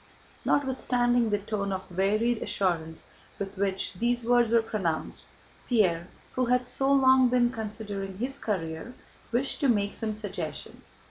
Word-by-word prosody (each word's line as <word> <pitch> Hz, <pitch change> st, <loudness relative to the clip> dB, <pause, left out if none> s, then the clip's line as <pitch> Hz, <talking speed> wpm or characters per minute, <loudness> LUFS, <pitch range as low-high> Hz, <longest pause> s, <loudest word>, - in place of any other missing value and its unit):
Notwithstanding 245 Hz, -3 st, +2 dB
the 205 Hz, -, +2 dB
tone 200 Hz, -1 st, -3 dB
of 190 Hz, -2 st, -5 dB
wearied 215 Hz, +5 st, +2 dB
assurance 165 Hz, -4 st, -1 dB, 0.3 s
with 200 Hz, 0 st, -5 dB
which 195 Hz, -1 st, -1 dB
these 240 Hz, +5 st, 0 dB
words 240 Hz, -1 st, +4 dB
were 230 Hz, 0 st, +4 dB
pronounced, 180 Hz, -8 st, -2 dB, 0.4 s
Pierre, 180 Hz, -8 st, +2 dB, 0.3 s
who 255 Hz, -, +1 dB
had 250 Hz, +1 st, +2 dB
so 270 Hz, +2 st, +1 dB
long 260 Hz, -2 st, +6 dB
been 240 Hz, -1 st, +3 dB
considering 205 Hz, -4 st, -5 dB
his 265 Hz, +5 st, -3 dB
career, 180 Hz, +3 st, -3 dB, 0.4 s
wished 255 Hz, +3 st, 0 dB
to 285 Hz, -, +2 dB
make 205 Hz, -3 st, +1 dB
some 215 Hz, -1 st, -3 dB
suggestion. 190 Hz, -7 st, -5 dB
220 Hz, 140 wpm, -28 LUFS, 195-245 Hz, 0.4 s, long